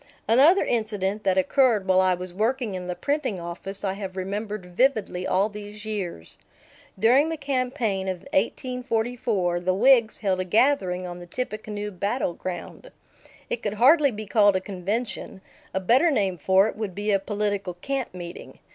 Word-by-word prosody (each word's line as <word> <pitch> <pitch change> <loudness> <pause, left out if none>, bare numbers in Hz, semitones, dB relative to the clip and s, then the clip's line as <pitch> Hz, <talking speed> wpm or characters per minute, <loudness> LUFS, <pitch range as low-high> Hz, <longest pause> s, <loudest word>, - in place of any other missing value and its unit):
Another 285 - +6
incident 210 -3 -1
that 190 -1 +2
occurred 215 +2 +3
while 185 0 +5
I 185 -1 +3
was 180 0 -7
working 225 +2 -1
in 180 -1 -5
the 180 - -3
printing 280 -8 -1
office 175 +4 -6
I 195 -1 0
have 195 -1 -7
remembered 205 +1 -4
vividly 190 -2 0
all 195 +3 +2
these 210 0 -9
years. 190 - -5 0.6
During 255 +9 +4
the 325 - -3
campaign 250 -8 -1
of 185 -2 -3
1844, 230 -4 -1
the 185 +1 0
Whigs 235 0 +4
held 190 -3 0
a - - +1
gathering 185 -3 +2
on 175 0 -7
the 175 - -10
Tippecanoe 210 -1 -4
battle 200 +1 -1
ground. 185 - -7 0.6
It 235 - -3
could 210 -1 -2
hardly 280 +6 +5
be 215 -3 -6
called 205 -1 +4
a - - +2
convention; 200 +3 -4 0.3
a 190 - -1
better 245 - +4
name 195 - 0
for 190 +6 +4
it - - -5
would 210 -4 -5
be 205 +1 -1
a 195 - +3
political 205 -2 -2
camp 270 +7 -3
meeting. 175 -1 -9
205 Hz, 165 wpm, -25 LUFS, 185-235 Hz, 0.6 s, Another